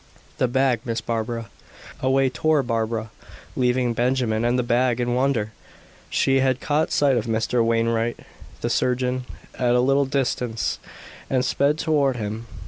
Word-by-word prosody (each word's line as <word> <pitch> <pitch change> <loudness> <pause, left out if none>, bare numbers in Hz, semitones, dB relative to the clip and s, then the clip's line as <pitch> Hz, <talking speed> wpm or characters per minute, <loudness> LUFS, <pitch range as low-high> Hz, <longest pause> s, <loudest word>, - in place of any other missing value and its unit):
"The 130 - +3
bag, 130 -1 +2
Miss 115 -3 -2
Barbara." 115 0 -3 0.5
Away 135 +1 +2
tore 140 +4 +1
Barbara, 115 -2 -2 0.4
leaving 125 -1 +1
Benjamin 120 -2 0
and 120 +1 +2
the 125 - +1
bag 120 0 +1
in 120 0 0
wonder. 125 -4 0 0.6
She 135 0 +2
had 130 -1 +2
caught 150 +3 0
sight 140 -3 +3
of 115 - -2
Mr. 115 +1 +1
Wainwright, 115 0 +1 0.4
the - - -1
surgeon, 125 0 0 0.3
at 125 -1 +2
a - - +4
little 135 +2 +3
distance, 125 -4 -1 0.5
and 130 -1 +1
sped 140 +3 +1
toward 145 -5 +1
him. 110 0 -5
125 Hz, 145 wpm, -23 LUFS, 115-135 Hz, 0.6 s, a